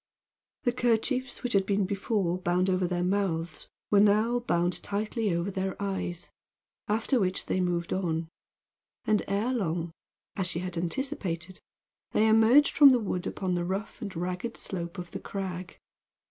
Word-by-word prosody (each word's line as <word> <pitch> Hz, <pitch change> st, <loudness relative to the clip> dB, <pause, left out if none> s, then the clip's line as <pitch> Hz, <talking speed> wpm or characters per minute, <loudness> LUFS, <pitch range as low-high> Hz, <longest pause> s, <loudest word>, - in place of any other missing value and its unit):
The 245 Hz, -, +2 dB
kerchiefs 250 Hz, +2 st, 0 dB
which 245 Hz, -, -1 dB
had 195 Hz, -1 st, +3 dB
been 200 Hz, -1 st, +2 dB
before 195 Hz, -2 st, -1 dB
bound 180 Hz, +1 st, +1 dB
over 185 Hz, -1 st, +1 dB
their 175 Hz, 0 st, -1 dB
mouths 180 Hz, -4 st, -1 dB, 0.2 s
were 205 Hz, -, +6 dB
now 215 Hz, +4 st, +4 dB
bound 175 Hz, -6 st, 0 dB
tightly 210 Hz, +1 st, -1 dB
over 170 Hz, +3 st, -1 dB
their 190 Hz, 0 st, -3 dB
eyes, 190 Hz, -3 st, -3 dB, 0.6 s
after 225 Hz, +5 st, +1 dB
which 185 Hz, -2 st, 0 dB
they -, -, 0 dB
moved 175 Hz, -1 st, -1 dB
on; 165 Hz, -3 st, -1 dB, 0.8 s
and 215 Hz, -2 st, +3 dB
ere 210 Hz, +6 st, 0 dB
long, 170 Hz, -7 st, -1 dB, 0.4 s
as 190 Hz, -2 st, -1 dB
she 170 Hz, -, -2 dB
had 180 Hz, 0 st, -4 dB
anticipated, 180 Hz, -, -3 dB, 0.5 s
they 220 Hz, -, +4 dB
emerged 225 Hz, +6 st, +5 dB
from 285 Hz, -1 st, +9 dB
the 250 Hz, -, +3 dB
wood 185 Hz, -5 st, -2 dB
upon 185 Hz, -2 st, -2 dB
the 175 Hz, -1 st, 0 dB
rough 195 Hz, +5 st, -4 dB
and 200 Hz, -4 st, -5 dB
ragged 180 Hz, +6 st, -3 dB
slope 170 Hz, -1 st, -5 dB
of 175 Hz, -1 st, -7 dB
the -, -, -5 dB
crag. 185 Hz, -2 st, -5 dB
190 Hz, 160 wpm, -28 LUFS, 175-215 Hz, 0.8 s, from